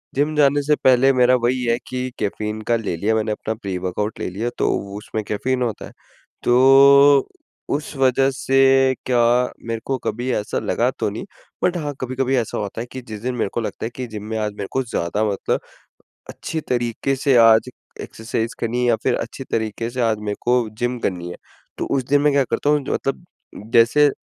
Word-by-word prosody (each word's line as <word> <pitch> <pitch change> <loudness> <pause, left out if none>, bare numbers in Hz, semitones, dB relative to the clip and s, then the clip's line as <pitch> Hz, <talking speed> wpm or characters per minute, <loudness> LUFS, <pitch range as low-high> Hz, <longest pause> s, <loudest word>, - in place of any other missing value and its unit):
Gym 145 +3 0
जाने 145 -1 +3
से 150 +1 +2
पहले 130 +1 +5
मेरा 125 0 +4
वही 125 +1 +1
है 115 -1 +1
कि 130 0 -3
कैफ़ीन 105 +1 -3
का - - +5
ले 110 -6 -2
लिया 105 +6 0
मैंने 110 0 0
अपना 110 +1 -3
प्री-वर्कआउट 100 0 -4
ले - - -3
लिया 105 +6 -3
तो - - +1 0.3
उसमें 110 +1 -5
कैफ़ीन 125 +5 -2
होता 115 -4 -2
है। - - -12 0.5
तो, 140 +2 +6 0.4
उस 145 +1 -3
वज़ह 135 0 +3
से 135 -1 +4
क्या 125 -2 +1 0.5
मेरे 115 0 -2
को 135 - -1
कभी 125 +3 -2
ऐसा 105 - -2
लगा - - 0
तो - - 0
नहीं - - -6 0.4
बट 180 0 +2
हाँ 150 -3 -3
कभी-कभी 130 +1 -1
ऐसा 115 -3 -2
होता 105 +2 -4
है 120 - -6
कि 130 - -7
जिस 110 -1 -7
दिन 125 +2 -2
मेरे 115 - -1
को 120 - -1
लगता 110 - -5
है - - -3
कि 130 -1 -5
जिम 110 -2 -7
में 110 - -2
आज 105 -1 -1
मेरे 100 -1 -6
को 135 - 0
ज़्यादा 105 -3 -2
मतलब 100 -2 -1 0.7
अच्छी 160 - -5
तरीके 120 +2 -1
से 135 0 +2
आज 115 0 +6 0.3
एक्सरसाइज़ 110 0 -4
करनी 115 +2 -1
है 125 - +1
या 115 - +4
फ़िर - - +1
अच्छी - - -6
तरीक़े 110 +1 -2
से 125 +1 -4
आज 115 -3 +1
मेरे 105 - -2
को 120 -2 +1
जिम 120 +1 -1
करनी 90 -4 -3
है। - - -7 0.4
तो - - -2
उस 130 - -1
दिन 145 +1 +4
मैं 150 0 +3
क्या 140 -1 +3
करता 145 +5 +1
हूँ, 150 0 +3
मतलब 135 +5 -2 0.5
जैसे 120 +6 +5
120 Hz, 205 wpm, -21 LUFS, 110-135 Hz, 0.7 s, तो